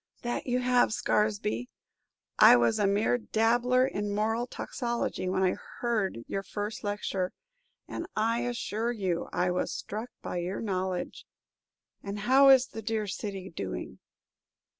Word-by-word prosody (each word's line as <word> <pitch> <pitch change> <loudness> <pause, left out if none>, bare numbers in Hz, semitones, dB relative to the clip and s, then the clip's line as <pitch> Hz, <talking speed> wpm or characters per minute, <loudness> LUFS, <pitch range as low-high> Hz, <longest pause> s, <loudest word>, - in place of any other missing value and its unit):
"That 240 +2 -3
you 250 0 +1
have, 250 -2 +3
Scaresby. 205 - 0 0.7
I - - +10
was 120 -1 +3
a 205 - +3
mere 210 +5 +2
dabbler 240 +3 +2
in 205 -6 -2
moral 225 +3 0
toxicology 235 -7 -3
when 190 +1 +1
I 185 - +4 0.3
heard 215 - -1
your 195 - -3
first 205 +2 -5
lecture, 200 -3 -2 0.5
and, 335 - -5
I 225 +2 +1
assure 235 -1 -2
you, 190 -7 -2
I 180 0 +1
was 180 - -1
struck 220 +4 -5
by - - -3
your 175 +2 -3
knowledge. 185 -4 -3 0.7
And 200 +1 -5
how 270 +5 +6
is 260 -1 +7
the 225 - -7
dear 220 0 -1
city 195 -1 -5
doing?" 95 - -5
210 Hz, 140 wpm, -29 LUFS, 190-240 Hz, 0.7 s, I